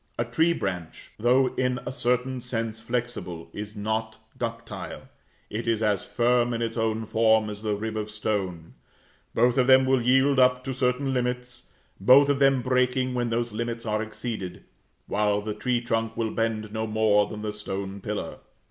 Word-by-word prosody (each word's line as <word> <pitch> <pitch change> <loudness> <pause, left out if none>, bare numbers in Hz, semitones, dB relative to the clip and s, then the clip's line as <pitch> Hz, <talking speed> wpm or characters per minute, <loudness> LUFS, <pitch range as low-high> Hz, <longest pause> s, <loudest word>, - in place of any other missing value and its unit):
A 120 - 0
tree 160 +9 +2
branch, 90 - -4
though 125 +3 +3
in 125 -1 +1
a - - -3
certain 125 0 0
sense 115 -2 -3
flexible, 115 -8 -4
is 105 +1 -6
not 110 +1 -2 0.2
ductile; 115 -1 -6 0.4
it 115 +3 -4
is 115 -1 +1
as 105 -3 +1
firm 120 0 +2
in 115 - -3
its 115 0 -3
own 110 -1 0
form 110 -1 +3
as 105 0 -8
the 105 -1 -1
rib 110 +1 -4
of 110 -1 -3
stone; 100 -6 -3 0.6
both 120 +2 +3
of 125 - +3
them 130 0 +7
will 130 -1 +3
yield 130 +3 +4
up 125 0 +4
to 135 0 -3
certain 130 +1 0
limits, 125 0 -3 0.3
both 130 +8 +7
of 140 -1 +2
them 135 -2 +4
breaking 125 0 +1
when 120 -1 0
those 120 0 -1
limits 115 +1 -3
are 110 -1 0
exceeded; 110 -4 -5 0.4
while 105 0 +1
the 105 +1 -4
tree 120 +3 0
trunk 115 -2 -1
will 115 -2 -1
bend 110 -2 -2
no 110 0 -2
more 105 -1 +3
than 105 -1 -7
the 105 -1 -3
stone 100 -1 -5
pillar. 105 -5 -4
115 Hz, 175 wpm, -26 LUFS, 105-125 Hz, 0.6 s, them